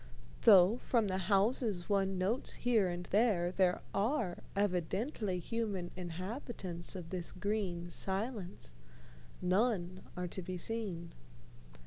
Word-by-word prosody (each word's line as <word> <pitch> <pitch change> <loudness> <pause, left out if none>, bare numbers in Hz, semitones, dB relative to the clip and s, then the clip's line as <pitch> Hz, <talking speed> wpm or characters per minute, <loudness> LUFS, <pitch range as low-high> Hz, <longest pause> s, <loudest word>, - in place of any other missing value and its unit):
Though, 195 +2 +8
from 230 -4 +1
the 185 0 0
houses 205 -2 +2
one 195 -2 +1
notes 200 +7 0
here 230 -5 +2
and 175 0 -3
there, 200 -5 +3
there 185 -1 +2
are 210 -3 0 0.2
evidently 195 - 0
human 200 -2 -2
inhabitants 185 - -4
of 170 -3 -7
this 180 -2 -2
green 185 -3 -2
silence, 190 - -4 0.7
none 185 -1 +1 0.2
are 180 0 -2
to 190 - -5
be 185 +1 -4
seen. 185 -5 -3
190 Hz, 115 wpm, -34 LUFS, 180-220 Hz, 0.7 s, Though